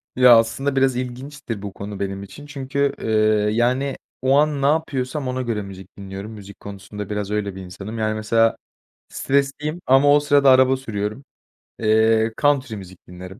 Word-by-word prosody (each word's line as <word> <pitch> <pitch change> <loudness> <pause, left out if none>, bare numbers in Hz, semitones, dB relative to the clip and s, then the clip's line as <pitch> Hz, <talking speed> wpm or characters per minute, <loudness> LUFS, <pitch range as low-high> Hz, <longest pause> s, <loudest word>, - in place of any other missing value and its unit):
Ya, 125 -2 +7
aslında 135 +5 0
biraz 135 -1 +2
ilginçtir 125 -1 -6
bu 100 -1 -7
konu 100 0 -7
benim 100 0 -4
için 145 +9 -11
çünkü, 140 0 -2
eee, - - -3 0.5
yani, 130 +4 +1 0.3
o 130 +2 +3
an 150 -1 +2
ne - - +1
yapıyorsam 145 -2 -1
ona 130 0 -2
göre 115 -4 -2
müzik 95 -1 -11
dinliyorum. 100 +2 -8
Müzik 100 -2 -12
konusunda 100 0 -8
biraz 105 -1 -3
öyle 105 -2 -2
bir 95 - -8
insanım. 95 +4 -8
Yani 110 0 0
mesela 115 +1 +2 0.5
stresliyim 140 +4 -1
ama 135 +2 +5
o - - +5
sırada 145 -1 +4
araba 130 0 +5
sürüyorum. 110 0 -4 0.6
Eee, 110 0 +3
country 140 -5 +2
müzik 95 -3 -11
dinlerim. 90 +2 -11
115 Hz, 165 wpm, -21 LUFS, 100-135 Hz, 0.6 s, Ya